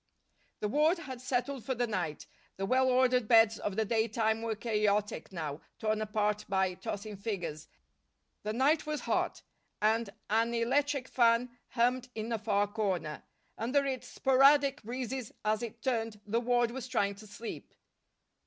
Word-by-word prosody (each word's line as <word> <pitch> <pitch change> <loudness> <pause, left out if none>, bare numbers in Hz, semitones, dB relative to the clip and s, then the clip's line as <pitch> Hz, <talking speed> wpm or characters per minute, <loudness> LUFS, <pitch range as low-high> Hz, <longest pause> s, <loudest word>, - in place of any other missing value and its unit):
The 210 - +1
ward 305 - +3
had 265 -7 -7
settled 255 0 -1
for 260 +3 -2
the 245 +1 +1
night. 180 -9 -3 0.3
The 195 - -1
well 260 +4 +3
ordered 250 -2 +3
beds 225 -1 +6
of 205 - -3
the 220 +1 +1
daytime 220 0 +1
were 225 -1 -2
chaotic 210 -2 0
now, 155 -4 -4 0.2
torn 215 -1 0
apart 210 -1 0
by 190 -1 +2
tossing 205 +3 -5
figures. 180 -7 -4 0.7
The 210 - -3
night 285 +7 +2
was 305 -1 -2
hot - - -1 0.4
and 220 +1 +2 0.2
an 230 +2 +2
electric 270 +3 +1
fan 240 0 +3
hummed 250 +1 +1
in 220 +1 -4
a 225 - 0
far 205 -2 +2
corner. 195 -7 -2 0.4
Under 265 +6 +1
its 265 -2 -3
sporadic 275 +2 +4
breezes, 250 +1 -4
as 215 0 +1
it 230 -1 -7
turned, 225 -4 -1
the 225 +3 0
ward 240 -1 +2
was 255 0 -6
trying 205 -6 +1
to 210 +2 -13
sleep. 225 +3 -8
230 Hz, 155 wpm, -31 LUFS, 210-255 Hz, 0.7 s, beds